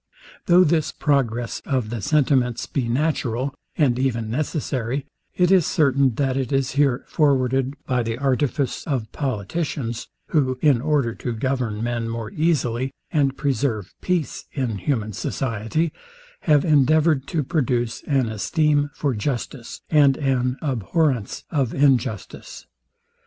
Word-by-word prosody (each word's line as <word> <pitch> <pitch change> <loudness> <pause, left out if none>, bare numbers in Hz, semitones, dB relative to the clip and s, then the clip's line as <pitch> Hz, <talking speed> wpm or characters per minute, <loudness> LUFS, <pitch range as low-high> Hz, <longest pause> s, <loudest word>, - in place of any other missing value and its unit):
Though 180 +1 +7
this 160 -2 +1
progress 120 -5 0
of 125 -5 -2
the 120 -3 -3
sentiments 135 -4 +2
be 130 -5 -2
natural, 130 -1 0 0.2
and 130 -6 +2
even 115 -4 -1
necessary, 135 -2 -2 0.3
it 180 0 +3
is 185 -5 +5
certain, 140 -4 +2
that 135 -1 0
it 135 -2 -2
is 135 -2 +1
here 135 -2 +1
forwarded 135 -3 +1
by 125 -2 +1
the 115 0 -3
artifice 135 +1 0
of 125 -8 -2
politicians, 125 - -3 0.2
who, 130 -5 +1
in 140 -5 +3
order 140 -5 +1
to 120 +1 -4
govern 115 -3 -2
men 120 -1 -2
more 115 -1 -4
easily, 135 -6 0 0.2
and 140 -3 +1
preserve 130 -8 -1
peace 180 -5 -1
in 120 -8 -2
human 110 -2 -1
society, 120 - -2 0.6
have 150 -2 +5
endeavoured 150 -1 +3
to 160 -5 -1
produce 125 -6 -1
an 135 -4 +2
esteem 145 - +1
for 140 -3 0
justice, 120 +2 -4
and 145 -4 +5
an 130 -2 0
abhorrence 130 - 0
of 135 -6 0
injustice. 130 -7 0
135 Hz, 130 wpm, -23 LUFS, 120-145 Hz, 0.6 s, Though